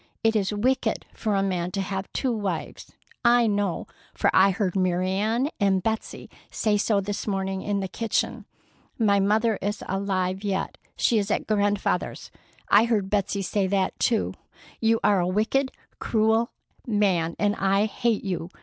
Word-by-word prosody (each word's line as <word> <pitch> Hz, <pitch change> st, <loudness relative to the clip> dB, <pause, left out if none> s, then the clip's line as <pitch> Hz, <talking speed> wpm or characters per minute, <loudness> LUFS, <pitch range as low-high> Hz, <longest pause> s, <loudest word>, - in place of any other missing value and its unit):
It 225 Hz, 0 st, +3 dB
is 200 Hz, -2 st, +1 dB
wicked 230 Hz, +2 st, 0 dB
for 215 Hz, -2 st, -1 dB
a 195 Hz, -, +2 dB
man 180 Hz, -3 st, -1 dB
to 200 Hz, -, -2 dB
have 190 Hz, 0 st, -4 dB
two 260 Hz, -, -1 dB
wives. 200 Hz, -7 st, -4 dB, 0.3 s
I 240 Hz, 0 st, +5 dB
know, 205 Hz, -4 st, 0 dB, 0.3 s
for -, -, +2 dB
I 190 Hz, +1 st, +6 dB
heard 190 Hz, -1 st, -1 dB
Mary 185 Hz, 0 st, +1 dB
Ann 220 Hz, +8 st, 0 dB
and 195 Hz, -2 st, +2 dB
Betsey 220 Hz, 0 st, -3 dB, 0.2 s
say 215 Hz, -2 st, 0 dB
so 205 Hz, 0 st, +2 dB
this 205 Hz, +2 st, -4 dB
morning 190 Hz, -1 st, -2 dB
in 200 Hz, 0 st, -1 dB
the 190 Hz, -, -2 dB
kitchen. 225 Hz, +4 st, -2 dB, 0.5 s
My 205 Hz, -4 st, +3 dB
mother 215 Hz, +2 st, +2 dB
is 205 Hz, +2 st, -3 dB
alive 190 Hz, 0 st, -1 dB
yet. 195 Hz, -1 st, -2 dB, 0.2 s
She 230 Hz, -, +2 dB
is 200 Hz, 0 st, -2 dB
at -, -, 0 dB
Grandfather's. 205 Hz, -1 st, -1 dB, 0.4 s
I 210 Hz, +3 st, +6 dB
heard 210 Hz, -5 st, 0 dB
Betsey 200 Hz, -1 st, 0 dB
say 195 Hz, +1 st, 0 dB
that 190 Hz, 0 st, 0 dB
too. 225 Hz, -3 st, +1 dB, 0.5 s
You 225 Hz, 0 st, +2 dB
are 205 Hz, -2 st, +4 dB
a 175 Hz, -, +1 dB
wicked, 220 Hz, +8 st, +1 dB, 0.3 s
cruel 220 Hz, +1 st, +2 dB, 0.4 s
man, 190 Hz, -7 st, +1 dB
and 205 Hz, 0 st, +1 dB
I 195 Hz, +2 st, +2 dB
hate 220 Hz, +1 st, 0 dB
you. 180 Hz, -3 st, -3 dB
205 Hz, 165 wpm, -25 LUFS, 190-220 Hz, 0.5 s, I